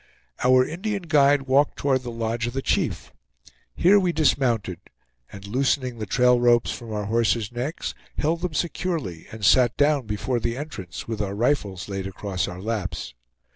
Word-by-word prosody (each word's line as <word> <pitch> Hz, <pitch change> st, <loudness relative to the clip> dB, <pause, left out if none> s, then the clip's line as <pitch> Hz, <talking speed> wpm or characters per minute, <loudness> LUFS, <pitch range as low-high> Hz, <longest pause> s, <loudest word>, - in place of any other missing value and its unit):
Our 130 Hz, 0 st, +5 dB
Indian 195 Hz, +5 st, -3 dB
guide 145 Hz, -3 st, +4 dB
walked 135 Hz, +2 st, +2 dB
toward 135 Hz, -2 st, +1 dB
the 125 Hz, -, -6 dB
lodge 115 Hz, 0 st, -2 dB
of 120 Hz, -, -4 dB
the 135 Hz, 0 st, -3 dB
chief. -, -, -1 dB, 0.6 s
Here 200 Hz, +4 st, +5 dB
we 180 Hz, -2 st, +1 dB
dismounted; 120 Hz, -, +1 dB, 0.5 s
and 100 Hz, -1 st, -10 dB
loosening 125 Hz, +2 st, 0 dB
the 110 Hz, -, -4 dB
trail 125 Hz, +4 st, +4 dB
ropes 120 Hz, -1 st, +3 dB
from 115 Hz, -2 st, -7 dB
our 105 Hz, -1 st, -3 dB
horses' 115 Hz, 0 st, +1 dB
necks, 125 Hz, +6 st, -4 dB, 0.2 s
held 165 Hz, +3 st, 0 dB
them 175 Hz, -3 st, -3 dB
securely, 160 Hz, -, -3 dB
and 110 Hz, -2 st, -4 dB
sat 120 Hz, +2 st, +4 dB
down 145 Hz, -4 st, +2 dB
before 115 Hz, +4 st, -1 dB
the 115 Hz, +2 st, -2 dB
entrance, 105 Hz, -, -7 dB
with 110 Hz, -2 st, -3 dB
our 100 Hz, -1 st, -3 dB
rifles 105 Hz, -6 st, 0 dB
laid 95 Hz, -1 st, -4 dB
across 95 Hz, -2 st, -3 dB
our 90 Hz, +1 st, -7 dB
laps. 90 Hz, -, -3 dB
120 Hz, 170 wpm, -24 LUFS, 105-145 Hz, 0.6 s, Our